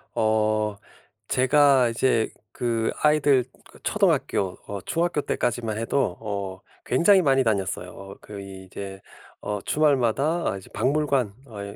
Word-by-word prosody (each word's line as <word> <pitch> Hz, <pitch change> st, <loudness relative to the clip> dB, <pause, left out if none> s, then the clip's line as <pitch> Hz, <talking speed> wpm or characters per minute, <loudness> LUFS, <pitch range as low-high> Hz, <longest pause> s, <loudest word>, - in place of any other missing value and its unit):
어 110 Hz, -1 st, +1 dB, 0.5 s
제가 135 Hz, -1 st, +4 dB
이제 115 Hz, -1 st, +1 dB, 0.2 s
그 115 Hz, -2 st, -1 dB
아이들 145 Hz, -4 st, +3 dB, 0.2 s
그 -, -, -17 dB
초등학교, 95 Hz, -2 st, +1 dB
어 100 Hz, -2 st, -5 dB
중학교 165 Hz, -, 0 dB
때까지만 115 Hz, -5 st, -2 dB
해도 115 Hz, -3 st, 0 dB
어 100 Hz, -3 st, -5 dB, 0.2 s
굉장히 185 Hz, +9 st, +5 dB
많이 135 Hz, -4 st, +3 dB
다녔어요. 95 Hz, -2 st, -3 dB
그 100 Hz, -1 st, -9 dB
이제 95 Hz, 0 st, -9 dB, 0.4 s
어 105 Hz, -1 st, -3 dB
주말마다 145 Hz, -, +1 dB
아 100 Hz, -, -4 dB
이제 95 Hz, -, -13 dB
박물관 140 Hz, -6 st, +1 dB
어 110 Hz, -3 st, -11 dB
이 100 Hz, 0 st, -8 dB
115 Hz, 255 characters per minute, -25 LUFS, 100-140 Hz, 0.5 s, 굉장히